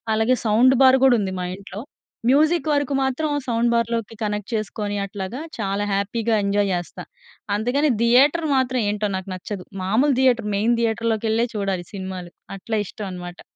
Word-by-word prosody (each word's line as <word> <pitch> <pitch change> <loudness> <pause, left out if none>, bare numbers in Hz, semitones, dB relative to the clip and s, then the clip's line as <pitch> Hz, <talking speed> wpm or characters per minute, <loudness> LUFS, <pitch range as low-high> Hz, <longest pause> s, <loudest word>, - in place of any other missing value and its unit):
అలాగే 225 +3 +2
sound 235 +5 +5
bar 260 0 +6
కూడా 250 -2 +5
ఉంది, 190 -2 -3
మా 180 - -3
ఇంట్లో. 200 +1 -9 0.5
మ్యూజిక్ 310 +3 +3
వరకు 285 -1 0
మాత్రం 265 +4 -1 0.2
సౌండ్ 235 -1 +1
బార్‍లోకి 230 -1 -1
కనెక్ట్ 210 0 -3
చేసుకొని 210 -1 -3
అట్లాగా, 200 +4 -6 0.2
చాలా 200 -1 -1
హ్యాపీగా 220 +3 0
ఎంజాయ్ 200 0 +1
జేస్తా. 175 -1 -5 0.5
అంతేగాని 250 +8 +1
థియేటర్ 280 +8 +4
మాత్రం 255 -1 +1
ఏంటో 210 0 -1
నాకు 190 +1 -7
నచ్చదు. 185 0 -7 0.2
మామూలు 235 +10 +2
థియేటరు 240 -5 +2
మెయిన్ 230 +4 +2
థియేటర్‌ 230 0 0
లోకెళ్ళే 225 +2 0
చూడాలి 195 -3 -2
సినిమాలు. 185 -3 -6 0.3
అట్లా 220 +3 -3
ఇష్టం 210 - -7
అనమాట. 175 -1 -8
220 Hz, 155 wpm, -22 LUFS, 200-250 Hz, 0.5 s, bar